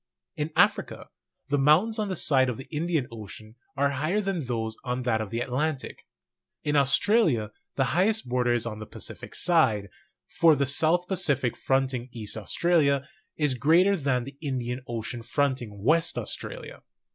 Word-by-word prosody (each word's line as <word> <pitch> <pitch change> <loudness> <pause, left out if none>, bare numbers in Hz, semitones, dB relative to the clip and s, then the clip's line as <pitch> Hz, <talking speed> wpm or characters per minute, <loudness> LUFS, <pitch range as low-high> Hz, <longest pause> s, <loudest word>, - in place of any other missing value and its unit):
In 150 +2 -3
Africa, - - +1 0.4
the 145 0 +2
mountains 175 - +4
on 210 - 0
the 185 - -2
side 135 -5 +3
of 125 - -3
the 135 - -8
Indian 160 -4 0
Ocean; 110 0 -10 0.2
are 140 +1 +2
higher 155 +9 0
than 195 -7 -2
those 110 -2 -2
on 125 0 -2
that 115 -3 +1
of 110 - -5
the 115 +2 -3
Atlantic. 135 +3 -3 0.6
In 150 0 0
Aus 140 -2 +5
tralia 160 - +2 0.2
the 135 - +2
highest 210 - +2
border 125 0 +1
is 120 -1 0
on 110 -2 -5
the 110 - -8
Pacific - - -8
side; 125 - +2 0.4
for 165 -2 +4
the 140 0 +1
South 160 +6 +1
Pacific 140 - 0
fronting 130 -2 -1
east 110 -4 -5
Australia, 140 - +1 0.3
is 150 -3 +1
greater 165 +10 +4
than 135 -7 0
the 140 +2 -11
Indian 130 -4 -3
Ocean 120 +1 -5
fronting 120 -5 -2
west 165 +6 +2
Australia. - - -5
135 Hz, 165 wpm, -27 LUFS, 120-160 Hz, 0.6 s, Aus